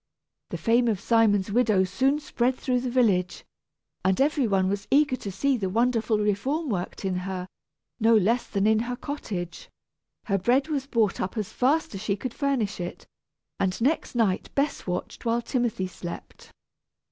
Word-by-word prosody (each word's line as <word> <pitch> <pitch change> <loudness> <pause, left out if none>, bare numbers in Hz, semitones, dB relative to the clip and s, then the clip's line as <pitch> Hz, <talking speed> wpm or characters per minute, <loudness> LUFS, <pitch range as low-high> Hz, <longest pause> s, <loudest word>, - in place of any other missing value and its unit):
The - - -4
fame 240 +1 +2
of 215 -5 +1
Simon's 210 -3 +2
widow 215 -4 +3
soon 265 +10 +1
spread 255 -3 0
through 255 -1 0
the 255 - -2
village, 205 -8 +1 0.6
and 190 0 +2
every 280 -2 +2
one 190 -2 +2
was 200 +1 -2
eager 285 -1 +4
to 200 - -6
see 270 +8 +1
the 195 -4 -2
wonderful 230 +1 +1
reform 235 +10 0
worked 190 -1 -3
in 185 -1 0
her, 185 0 -4 0.5
no 225 0 +5
less 225 +5 +1
than 200 -1 0
in 220 0 +4
her 240 +2 -2
cottage. 210 - -6 0.5
Her 195 -2 0
bread 255 - +2
was 275 -3 -2
bought 225 -7 +1
up 185 +5 -3
as 210 -3 -3
fast 285 +3 +1
as 195 - -6
she 210 -2 0
could 230 +4 -5
furnish 260 -9 -1
it, 175 0 -6 0.5
and 190 -1 0
next 270 +2 0
night 215 -6 +1
Bess 280 -5 -1
watched 180 0 -4
while 235 0 0
Timothy 240 -7 -1
slept. 175 -1 -9
225 Hz, 170 wpm, -26 LUFS, 195-255 Hz, 0.6 s, no